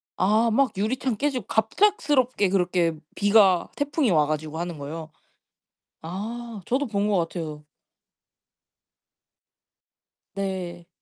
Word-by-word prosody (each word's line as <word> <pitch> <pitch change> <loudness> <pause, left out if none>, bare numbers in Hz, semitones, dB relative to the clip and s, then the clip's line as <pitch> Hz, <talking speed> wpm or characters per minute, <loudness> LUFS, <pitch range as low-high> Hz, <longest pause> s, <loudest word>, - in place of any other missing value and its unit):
아 215 +5 +3
막 265 +4 +3
유리창 230 +3 -1
깨지고 265 -5 -1
갑작스럽게 260 - +2
그렇게 180 -3 +1 0.2
비가 200 -4 +4
태풍이 285 -2 0
와 155 -3 +4
가지고 155 +1 -3
하는 170 -1 -4
거요? 155 +3 -7 0.9
아 215 +6 -6
저도 275 +4 0
본 205 -3 0
것 205 - +2
같아요. 160 -3 -4 2.7
네. 185 -3 -4
200 Hz, 205 characters per minute, -25 LUFS, 170-240 Hz, 2.7 s, 비가